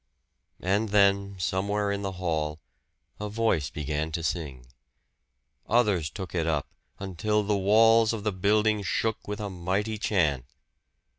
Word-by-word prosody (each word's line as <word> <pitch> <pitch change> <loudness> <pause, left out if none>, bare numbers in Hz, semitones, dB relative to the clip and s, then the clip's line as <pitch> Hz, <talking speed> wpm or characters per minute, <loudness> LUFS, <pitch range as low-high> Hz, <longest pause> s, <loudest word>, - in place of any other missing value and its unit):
And 100 +4 +1
then, 100 -1 +3
somewhere 100 +3 -1
in 100 0 -2
the 95 -1 -3
hall, 80 -4 -2 0.6
a 105 0 -4
voice 105 -10 0
began 75 +1 -3
to 85 0 -3
sing. 70 -8 -3 1.0
Others 105 -10 +2
took 95 +4 -7
it 85 -2 0
up, 75 -4 0 0.3
until 100 +3 -1
the 105 0 +1
walls 110 +3 +5
of 110 -3 -4
the 105 - 0
building 105 +3 +2
shook 110 +3 -2
with 105 +1 -4
a 105 - -3
mighty 95 +5 -2
chant. 75 - +1
100 Hz, 140 wpm, -27 LUFS, 85-105 Hz, 1.0 s, walls